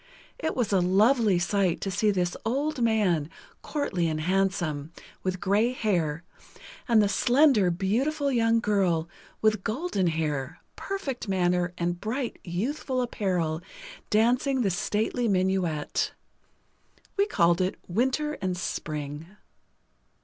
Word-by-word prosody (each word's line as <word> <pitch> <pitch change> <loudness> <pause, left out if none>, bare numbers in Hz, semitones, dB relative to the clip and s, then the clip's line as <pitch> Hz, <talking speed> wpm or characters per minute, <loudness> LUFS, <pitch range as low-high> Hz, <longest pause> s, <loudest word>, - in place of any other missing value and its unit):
It 320 - -2
was 235 -5 0
a 190 - +4
lovely 205 +3 +4
sight 180 0 +1
to 195 - -2
see 210 +3 +2
this 180 -3 0
old 270 +4 -1
man, 200 -10 +2 0.3
courtly 185 - -1
and 155 -1 -1
handsome, 175 -4 0 0.3
with 185 0 -2
gray 210 +6 +2
hair, 170 -9 -1 0.6
and 225 -4 +5
the - - +3
slender, 245 -2 +4
beautiful 260 - 0
young 230 -2 +3
girl, 185 -6 +1 0.4
with 215 -3 +2
golden 225 - -1
hair, 150 -5 -2 0.2
perfect 290 - -4
manner 180 -2 +1
and 175 0 -2
bright, 240 +3 -3
youthful 255 - -2
apparel, 180 -9 -1 0.5
dancing 250 +5 +2
the 200 -5 +1
stately 220 +6 -1
minuet. 185 -6 0 1.0
We 400 +1 +2
called 170 - +3
it 185 +1 0
"Winter 265 - 0
and 185 -1 -1
Spring." 150 -2 -4
195 Hz, 120 wpm, -27 LUFS, 175-240 Hz, 1.0 s, and